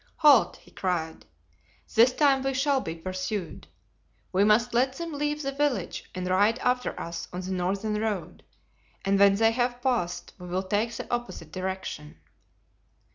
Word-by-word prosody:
"Halt!" 290 -7 +5
he - - -20
cried, 165 - -3 0.7
"this 235 +3 +6
time 275 0 +3
we 270 0 -1
shall 275 0 +2
be 165 -6 -5
pursued. 185 +1 -4 0.6
We 190 +2 +3
must 225 +3 +3
let 255 +2 +2
them 335 +2 -6
leave 295 +1 -2
the 275 - -1
village 280 -2 -1
and 185 0 -3
ride 205 +5 +3
after 250 0 -1
us 170 0 -5
on 180 - -4
the 185 +1 -5
northern 195 +4 -1
road, 190 -6 -3 0.6
and 195 0 +2
when 200 0 +6
they 225 +2 +4
have 245 +1 -1
passed 240 -9 -1
we 180 - -9
will 185 +2 -1
take 210 +4 0
the - - -5
opposite 240 -10 -4
direction." 185 -5 -5
210 Hz, 160 wpm, -27 LUFS, 185-255 Hz, 0.7 s, this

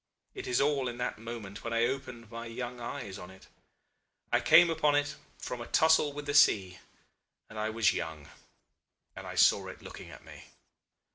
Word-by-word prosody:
It - - -7
is 125 - +1
all 140 -2 +1
in 120 -1 -5
that 125 -2 -3
moment 110 -3 -8
when 115 - -4
I 115 0 +3
opened 125 -4 -5
my 115 0 -7
young 120 +1 -6
eyes 120 -5 -6
on 90 - -10
it. 95 0 -15 0.9
I 120 - +4
came 160 +8 +6
upon 150 -2 +2
it 145 0 0 0.2
from 125 - -6
a 120 - -7
tussle 160 -2 +4
with 145 +1 -7
the 145 - -2
sea 95 -11 +4 0.7
and 110 - -9
I 110 0 -1
was 110 -2 +2
young 80 -3 -5 0.9
and - - -8
I - - -7
saw - - +4
it - - -10
looking - - -10
at - - -13
me. - - -13
120 Hz, 190 wpm, -30 LUFS, 110-145 Hz, 0.9 s, came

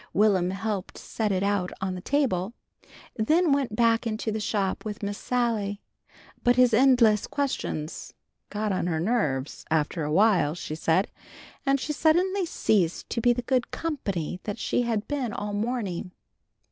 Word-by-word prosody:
Will'm 195 -3 +3
helped 195 0 -3
set 215 -2 -2
it 190 0 0
out 200 -3 0
on 190 -1 -2
the 180 - -6
table. 235 -6 0 0.6
Then 315 +10 +3
he - - +3
went 270 -6 +1
back 230 0 +3
into 220 0 -2
the 220 - -2
shop 200 -2 -1
with 210 -1 -6
Miss 200 0 -3
Sally. 225 -5 -1 0.6
But 245 0 +4
his 250 -1 +5
endless 235 -4 +5
questions 255 - -3 0.3
"got 210 0 -2
on 185 -2 -1
her 160 -2 0
nerves" 155 - -1
after 160 +1 0
awhile, 165 -1 +3
she 165 - -6
said, 165 +4 +1 0.6
and 275 0 +3
she 300 - -3
suddenly 360 +5 +2
ceased 185 - 0
to 230 - -1
be 245 - +4
the 245 0 -1
good 250 0 0
company 200 - -3
that 205 0 -3
she 235 - 0
had 225 -3 -1
been 265 -7 -2
all 205 0 -4
morning. 205 -5 -2
215 Hz, 160 wpm, -26 LUFS, 185-245 Hz, 0.6 s, his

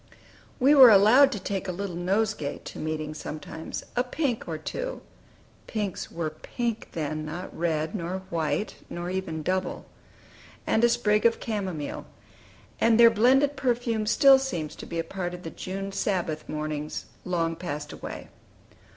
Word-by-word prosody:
We 275 +3 +6
were 265 -4 +10
allowed 225 +7 +7
to 210 - -4
take 195 +1 -3
a - - -1
little 185 0 -4
nosegay 190 -3 -1
to - - -8
meeting 155 -1 -3
sometimes: 155 +1 -6
a 245 - +2
pink 255 -2 -2
or 160 -2 -3
two - - -5 0.7
(pinks 205 -4 -3
were 165 -2 -3
pink 230 +8 -4
then, 155 -1 -3
not 165 +4 -6
red, 160 -2 -1
nor 185 -1 -3
white, 165 +5 -1
nor 175 +1 -4
even 165 -4 -3
double) 185 +2 -2 0.8
and 220 - +2
a 240 - +6
sprig 210 -3 +2
of 230 - -1
camomile; 190 -9 -4 0.7
and 230 0 +4
their 230 -1 +9
blended 265 +6 +4
perfume 240 -4 0
still 270 +4 +7
seems 175 - -3
to - - -9
be 170 - -5
a 165 - 0
part 175 +1 -4
of 180 - -11
the 165 - -6
June 195 +1 -5
Sabbath 175 -6 -2
mornings 150 0 -4 0.2
long 165 -2 -1
passed 150 -4 -5
away. - - -8
190 Hz, 155 wpm, -27 LUFS, 160-230 Hz, 0.8 s, were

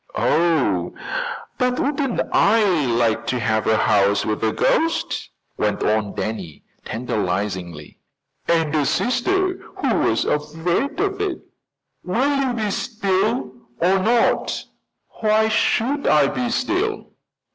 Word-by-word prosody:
"Oh, 140 - +1 0.6
but 250 0 +1
wouldn't 275 -3 0
I 220 +2 +4 0.2
like 115 -1 +1
to 125 - 0
have 110 -2 0
a 110 - +4
house 100 -2 +2
with 110 0 -2
a 110 - +2
ghost," 330 - 0 0.3
went - - 0
on 105 -1 0
Danny 95 -8 -5 0.2
tantalizingly. 95 -8 -3 0.5
"And 165 -3 +1
a 150 -3 +2
sister 370 +10 0 0.2
who - - 0
was - - +1
afraid 165 - -1
of 395 0 -1
it!" 385 -5 -2 0.6
"Will 255 +11 +1
you 275 -2 +1
be 215 -3 -1
still, 195 - -1 0.3
or 185 +3 +3
not?" 230 +4 +1 0.6
"Why 220 0 +3
should 255 +6 +1
I 150 -2 +5
be 245 -1 -2
still? 365 - -1
180 Hz, 120 wpm, -21 LUFS, -, 0.6 s, I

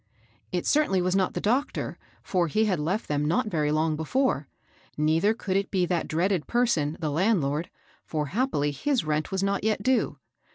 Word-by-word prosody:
It - - -2
certainly 290 -11 +3
was 180 +1 +1
not 190 -1 +1
the - - 0
doctor, 255 +8 -1 0.2
for 180 -3 +1
he 215 +8 +2
had 190 -6 0
left 180 +9 -1
them 145 0 0
not 165 +7 +1
very 150 -3 +1
long 155 +1 +1
before; 160 - 0 0.5
neither 160 +8 +2
could 190 -4 -3
it 195 0 0
be 185 -3 +1
that 175 -1 -1
dreaded 175 +1 0
person, 200 -12 +1
the 155 -3 -2
landlord, 165 -3 +1 0.3
for 155 -2 -2
happily 205 - +1
his 260 - 0
rent 155 0 -1
was 190 0 -1
not 200 0 0
yet 215 -1 0
due. 260 0 +1
180 Hz, 180 wpm, -26 LUFS, 155-215 Hz, 0.5 s, certainly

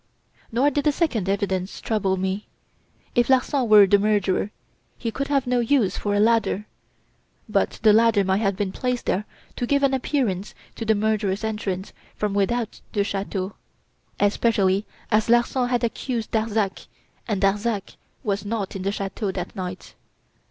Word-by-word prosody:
"Nor 260 +6 +3
did 290 +2 -1
the 300 - +5
second 250 - 0
evidence 190 -1 -1
trouble 195 -4 0
me. 190 +2 -2 0.7
If 240 0 +2
Larsan 260 -1 +2
were 210 -2 +9
the 200 +1 +4
murderer, 205 -1 +1 0.5
he 230 - -3
could 275 +4 -3
have 275 -2 +1
no 250 0 +1
use 235 -5 +2
for 205 -1 -1
a - - +2
ladder; 225 -2 +2 0.8
but - - 0
the 215 -2 +7
ladder 225 -2 +4
might 190 +2 +1
have 195 -3 +1
been 195 -1 -2
placed 250 +3 -2
there 205 +3 0 0.3
to 245 - -1
give 280 +1 +2
an 275 -1 +3
appearance 245 -8 -1 0.2
to 225 - -6
the 220 0 +3
murderer's 210 -1 0
entrance 210 -3 -3 0.2
from 210 -1 -1
without 220 +3 -1
the 205 - +2
chateau; 195 -1 -3 0.7
especially 205 -1 +2 0.2
as 215 +1 +2
Larsan 240 +1 +3
had 245 -1 0
accused 235 0 -2
Darzac 220 -3 -1 0.4
and 210 -4 0
Darzac 205 +1 0 0.3
was 200 -4 -1
not 205 -2 -3
in 195 - -4
the 195 +1 0
chateau 195 0 -3
that 180 -1 -5
night. 185 0 -6
210 Hz, 160 wpm, -24 LUFS, 195-235 Hz, 0.8 s, were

